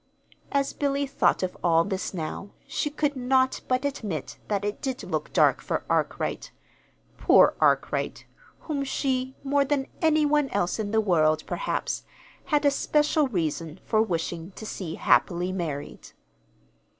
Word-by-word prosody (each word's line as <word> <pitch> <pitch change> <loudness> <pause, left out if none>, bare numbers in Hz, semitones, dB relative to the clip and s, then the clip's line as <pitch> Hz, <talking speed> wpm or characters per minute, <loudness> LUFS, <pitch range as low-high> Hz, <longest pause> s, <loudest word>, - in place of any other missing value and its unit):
As 280 -1 +1
Billy 280 0 0
thought 270 - +1
of 185 - -2
all 165 -1 +4
this 190 0 -3
now, 180 +3 -5 0.2
she 295 - -2
could 290 -1 -1
not 260 0 +2
but 255 +2 +1
admit 210 - -4
that 205 -1 -1
it 205 - -3
did 260 -2 -3
look - - -3
dark - - +4
for - - -3
Arkwright - - -1 0.7
poor - - +6
Arkwright, - - +1 0.4
whom 290 -3 -2
she, 260 -1 -1
more 280 0 +2
than 275 -1 0 0.2
any 310 -2 +4
one 295 -2 +2
else 195 -1 -1
in 210 -2 -2
the 220 +1 +2
world, 155 -6 +2
perhaps, - - -2 0.4
had 295 -1 +1
a 285 - +6
special 300 +1 +2
reason 165 - -3
for 215 -1 +3
wishing 170 -4 -2
to 220 - -8
see 175 -6 -5
happily 175 +8 +2
married. 160 -6 -5
230 Hz, 150 wpm, -26 LUFS, 175-280 Hz, 0.7 s, poor